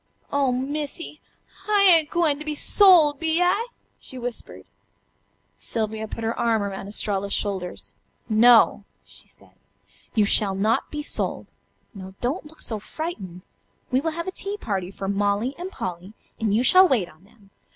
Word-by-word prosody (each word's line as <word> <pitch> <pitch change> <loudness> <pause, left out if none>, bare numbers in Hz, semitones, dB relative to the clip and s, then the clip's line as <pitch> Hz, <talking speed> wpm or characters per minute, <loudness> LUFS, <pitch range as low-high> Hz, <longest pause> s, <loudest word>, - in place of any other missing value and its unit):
"Oh, 280 -2 +1
Missy! 290 +4 -4 0.5
I 410 -1 +4
ain't 330 -5 +6
gwine 315 -4 +1
to - - -6
be 305 -1 -4
sold, 325 -5 +5
be 325 0 +1
I?" 370 +6 +1 0.3
she 260 - -9
whispered. 245 -1 -7 0.9
Sylvia 220 -1 -3
put 225 - -7
her 225 +1 -1
arm 225 -3 +1
around 195 -1 -5
Estralla's 200 -1 -1
shoulders. 190 -3 -4 0.3
"No!" 225 -1 +5 0.2
she - - -11
said, - - -19 0.6
"you 215 -2 +4
shall 200 -1 +3
not 215 +4 0
be 300 -1 -5
sold. - - -3 0.4
Now, 190 -2 -10
don't 285 +6 -3
look 315 +1 -17
so 220 -2 -4
frightened. 200 - -7 0.5
We 255 +1 +2
will 325 - -1
have 335 +2 -5
a - - -2
tea 395 +2 -5
party 195 - -3
for 195 0 -7
Molly 205 +5 0
and 360 +2 -5
Polly, 185 - -7 0.3
and 220 -3 0
you 220 +4 +2
shall 370 +9 +7
wait 235 - +1
on 155 +1 -20
them. 205 -1 -24
235 Hz, 160 wpm, -23 LUFS, 200-310 Hz, 0.9 s, shall